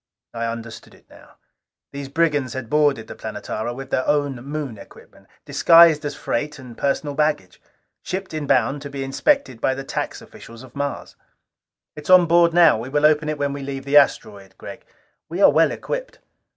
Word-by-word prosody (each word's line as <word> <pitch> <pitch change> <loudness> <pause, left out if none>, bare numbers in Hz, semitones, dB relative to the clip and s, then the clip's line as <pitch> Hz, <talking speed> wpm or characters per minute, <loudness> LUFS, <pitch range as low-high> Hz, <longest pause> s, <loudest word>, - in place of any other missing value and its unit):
'" - - -69
I 115 0 -3
understood 115 -1 -8
it - - -24
now. - - -18 0.6
These 140 -1 -7
brigands 145 -5 0
had 130 -3 -7
boarded 145 -6 +2
the - - -9
Planetara 110 +2 -5
with 135 +1 -9
their 130 - -1
own 145 -3 0
Moon 140 -6 -6
equipment, - - -17 0.2
disguised 165 -2 +5
as 145 -1 -4
freight 150 +4 -3
and 125 -3 -12
personal 140 +2 -2
baggage. 145 -12 -2 0.4
Shipped 190 -1 -5
in 155 -2 -4
bond, 130 +4 +1
to 145 - -7
be 140 -1 -5
inspected 135 - 0
by 130 - +1
the 135 - -6
tax - - -4
officials 115 +2 -14
of 130 -1 -16
Mars. 140 0 -5 0.8
"It 150 - -10
is - - -10
on 185 -1 +7
board 170 0 +4
now. 165 -8 +5
We 120 +3 -7
will 145 +2 +1
open 150 0 +3
it 155 - -3
when 140 -1 -2
we 140 - -6
leave 135 0 -6
the 140 +1 +3
asteroid, 100 -8 +1
Gregg. - - -11 0.4
We 170 +3 -5
are - - +6
well - - +3
equipped." - - -6
140 Hz, 190 wpm, -21 LUFS, 130-155 Hz, 0.8 s, on